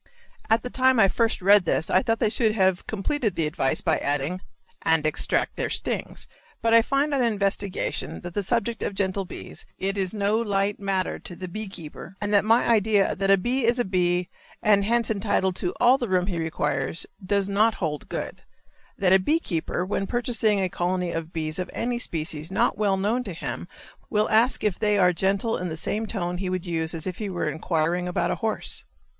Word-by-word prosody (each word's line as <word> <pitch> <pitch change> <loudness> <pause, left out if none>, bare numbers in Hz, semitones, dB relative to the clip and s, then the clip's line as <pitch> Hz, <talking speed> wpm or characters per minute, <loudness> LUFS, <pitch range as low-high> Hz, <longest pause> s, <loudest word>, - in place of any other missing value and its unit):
At 225 +1 +3
the 250 - -5
time 260 -1 +3
I 195 - +7
first 225 -1 0
read 200 -1 +6
this 160 - 0
I 185 - +3
thought 225 +2 0
they 215 - +1
should 220 -1 +1
have 190 -3 +2
completed 220 0 -1
the 165 - +1
advice 150 -3 0
by - - +1
adding 145 +6 -2 0.4
"and 160 -1 +2
extract 155 - 0
their - - -1
stings;" - - -3 0.3
but 230 0 +1
I 230 - +8
find 275 +5 0
on 275 - +2
investigation 200 -4 -1
that 175 0 -7
the 205 - 0
subject 230 +2 -1
of 200 - -3
gentle 195 0 0
bees, - - -8
is 195 -1 -1
no 210 0 +1
light 205 -3 0
matter 195 -2 -1
to 175 - -9
the 185 +2 -6
bee 215 +4 -5
keeper, 175 0 -9
and 205 0 -2
that 200 - +5
my 225 +3 +3
idea 215 -3 +3
that 195 +1 -1
"a 195 - +7
bee 245 +7 0
is 235 +2 +3
a 245 - +1
bee 180 -1 +1 0.4
and 205 -1 +4
hence 230 0 +2
entitled 195 -3 0
to 180 - -1
all 255 +2 +5
the 240 -5 -3
room 180 -1 +2
he 180 -3 -3
requires" 155 -2 -1 0.2
does 200 +1 +1
not 215 +3 +3
hold 150 -5 -4
good; - - -5 0.6
that 185 -1 +3
a 190 - +7
bee 300 - +2
keeper 175 - -2
when 195 0 -2
purchasing 235 -4 +1
a 190 - +1
colony 180 0 -1
of 165 0 -4
bees 155 0 -4
of 180 - -3
any 240 +1 -2
species 160 -5 -3
not - - +2
well 200 -2 +1
known 215 +6 0
to 195 -6 -6
him 165 - -5 0.4
will 210 0 +2
ask 230 +4 +3
if 210 -4 0
they 210 -1 +2
are 180 -2 +4
gentle 195 +5 +1
in 180 0 -3
the 160 - -4
same 215 +7 -2
tone 180 -4 -3
he 190 -1 -2
would 185 -1 -2
use 165 -1 -1
if 185 -2 -5
he 210 -2 -3
were 175 -4 -2
inquiring 165 +3 -1
about 180 - 0
a - - 0
horse. 220 -1 -1
195 Hz, 210 wpm, -25 LUFS, 180-220 Hz, 0.6 s, I